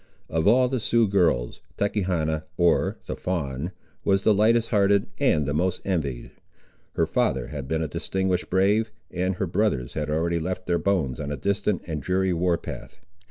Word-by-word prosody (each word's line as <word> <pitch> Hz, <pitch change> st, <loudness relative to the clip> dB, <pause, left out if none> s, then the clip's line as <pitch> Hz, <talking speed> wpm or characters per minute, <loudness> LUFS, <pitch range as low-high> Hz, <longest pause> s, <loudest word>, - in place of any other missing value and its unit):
Of 80 Hz, +2 st, +1 dB
all 125 Hz, +4 st, +5 dB
the 130 Hz, 0 st, -1 dB
Sioux 115 Hz, 0 st, +2 dB
girls, 85 Hz, -11 st, +1 dB, 0.2 s
Tachechana 90 Hz, -7 st, 0 dB
(or 85 Hz, -1 st, +2 dB
the -, -, -4 dB
Fawn) 80 Hz, -3 st, -3 dB, 0.3 s
was 95 Hz, 0 st, +2 dB
the 110 Hz, -, +5 dB
lightest 115 Hz, +3 st, +3 dB
hearted 100 Hz, -2 st, +3 dB
and 80 Hz, -, +3 dB
the 70 Hz, -, -1 dB
most 90 Hz, +4 st, 0 dB
envied. 75 Hz, -10 st, -2 dB, 0.6 s
Her -, -, +2 dB
father -, -, 0 dB
had 70 Hz, -3 st, -6 dB
been 80 Hz, +2 st, 0 dB
a -, -, -1 dB
distinguished 90 Hz, +3 st, -1 dB
brave, 100 Hz, +4 st, +2 dB, 0.2 s
and 90 Hz, +1 st, -1 dB
her 95 Hz, -, -1 dB
brothers 85 Hz, -, 0 dB
had 75 Hz, -1 st, -3 dB
already 85 Hz, +2 st, 0 dB
left 90 Hz, +2 st, -4 dB
their 85 Hz, -1 st, +1 dB
bones 85 Hz, -11 st, 0 dB
on 75 Hz, -1 st, -4 dB
a 75 Hz, -, -3 dB
distant 100 Hz, +4 st, -1 dB
and 80 Hz, -3 st, -4 dB
dreary 95 Hz, +5 st, +1 dB
war 85 Hz, 0 st, +1 dB
path. -, -, -9 dB
90 Hz, 175 wpm, -25 LUFS, 80-100 Hz, 0.6 s, all